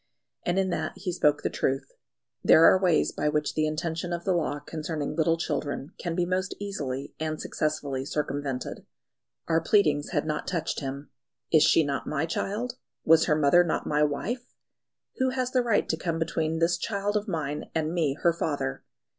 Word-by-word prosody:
And 175 +1 +1
in 190 -1 +1
that - - -2
he 185 -1 -3
spoke 150 -4 +2
the - - +1
truth. 135 0 -1 0.5
There 160 - +7
are 185 - +6
ways 175 -5 +3
by 150 - 0
which 150 0 0
the 155 0 +1
intention 165 +2 -3
of 170 0 -3
the 190 - +2
law 155 -4 0
concerning 150 0 -4
little 165 +1 +2
children 145 -2 -3
can 170 -2 -3
be 175 0 +1
most 185 +2 -1
easily 145 -10 -4
and 155 0 -2
successfully 145 -3 -2
circumvented. 140 -2 -3 0.6
Our 165 0 +2
pleadings 155 -7 +2
had - - 0
not 150 -1 -2
touched 170 -3 -2
him. 140 0 -6 0.4
"Is 155 - +6
she 160 - +5
not 140 -2 -3
my 150 +1 0
child? 225 +9 -3 0.3
Was 165 0 +6
her 150 - +3
mother 155 +4 +5
not 170 - -1
my 150 0 +1
wife? 210 - -2 0.6
Who 260 0 +2
has 255 -1 -1
the 255 - +3
right 230 -4 +1
to 160 - +1
come 165 0 -2
between 160 0 -1
this 170 +1 +2
child 205 0 -2
of 210 +1 0
mine 150 -5 -3
and 160 0 0
me 155 -6 +1
her 170 - +5
father?" 145 - -2
160 Hz, 185 wpm, -27 LUFS, 150-180 Hz, 0.6 s, There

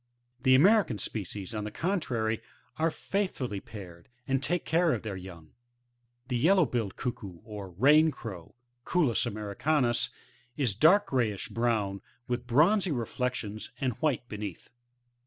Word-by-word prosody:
The 130 +1 +5
American 190 - +5
species, 100 -1 -4
on 105 -1 -3
the 105 - -3
contrary, 120 - -1 0.4
are 160 +1 +2
faithfully 155 - -2
paired, 90 -5 -11 0.2
and 135 -1 +1
take 170 +4 -1
care 165 0 +3
of - - -3
their 105 -3 -4
young. 90 -4 -10 0.8
The 125 -1 -1
VeUoW'billed 130 - +3
Cuckoo, 100 -7 -5
or 105 -3 -7
Rain 145 - +5
Crow^ 100 - -8 0.3
^Cuculus 150 -9 +1
americanns^ 120 +4 0 0.2
— 120 -1 -34
^is 125 -9 0
dark 195 +8 +6
grayish 115 -7 0
brown, 110 -5 0 0.3
with 120 0 -3
bronzy 175 - +4
reflections, 120 -4 -3
and 130 -2 0
white 145 -6 0
beneath. 105 -5 -7
120 Hz, 135 wpm, -29 LUFS, 105-150 Hz, 0.8 s, dark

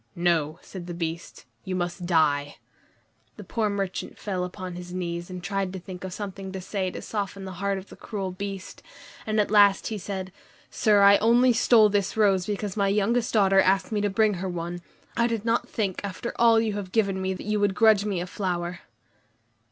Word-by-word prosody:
"No," 170 -3 +1
said 180 -3 -9
the 175 - -5
Beast, 170 0 -5 0.2
"you 190 -2 -3
must 175 0 -3
die!" 145 -4 +2 0.8
The 210 - -8
poor 215 +3 -1
merchant 195 -2 -3
fell 190 -3 -3
upon 180 0 -6
his 175 0 -8
knees 175 -1 -4
and 180 -1 -7
tried 195 -1 -2
to 190 - -5
think 180 0 -9
of 190 - -5
something 195 -1 -6
to 190 - -4
say 185 0 -2
to - - -8
soften 200 -2 -4
the 190 - -6
heart 200 0 0
of 190 +1 -9
the - - -11
cruel 195 -4 -5
Beast; 195 0 -7 0.5
and 215 0 +1
at 210 - +1
last 205 -2 +5
he 215 -2 -4
said, 190 -1 -5 0.4
"Sir, 205 -2 +4
I 200 0 +8
only 240 +3 +4
stole 225 -2 +5
this 200 0 -1
rose 195 -4 +3
because 205 -2 -3
my 200 -2 +1
youngest 220 +4 +1
daughter 195 -3 +5
asked 195 +3 +2
me 210 -1 0
to 205 - +1
bring 215 +1 +2
her 190 - -2
one. 175 0 -5 0.3
I 235 0 +3
did 230 -2 -3
not 230 +1 0
think, 200 -5 -2
after 200 +4 -5
all 230 -1 +5
you 220 -2 0
have 200 -3 -5
given 195 -3 +1
me, 190 0 -1
that - - -9
you 210 0 0
would 200 -2 +1
grudge 215 -2 +5
me 200 -4 -1
a - - -3
flower." 175 -2 -3
195 Hz, 205 wpm, -26 LUFS, 180-210 Hz, 0.8 s, I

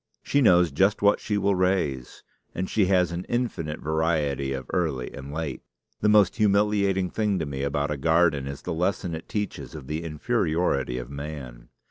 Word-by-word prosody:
She 145 - +2
knows 90 - +5
just 95 +8 +2
what 100 0 +5
she 105 - -2
will 100 0 +2
raise; 90 -9 -1 0.3
and 95 +1 -2
she 100 -2 +2
has 90 -2 +3
an 85 +1 -4
infinite 95 -11 -2
variety 75 -3 0
of 65 -1 -4
early 75 -8 -1
and 70 +1 -8
late. 75 -3 -4 0.4
The 105 - +2
most 105 -2 +4
humiliating 100 -3 +2
thing 105 -3 0
to 80 - -2
me 70 -2 -4
about 70 +1 -1
a 75 - -2
garden 80 -1 +2
is 70 0 -7
the - - -3
lesson 90 +1 -1
it 80 +1 -7
teaches 105 -2 -4
of - - -8
the 75 +4 -4
inferiority 75 -4 0
of 60 +1 -6
man. 70 -4 -8
80 Hz, 180 wpm, -26 LUFS, 70-95 Hz, 0.4 s, knows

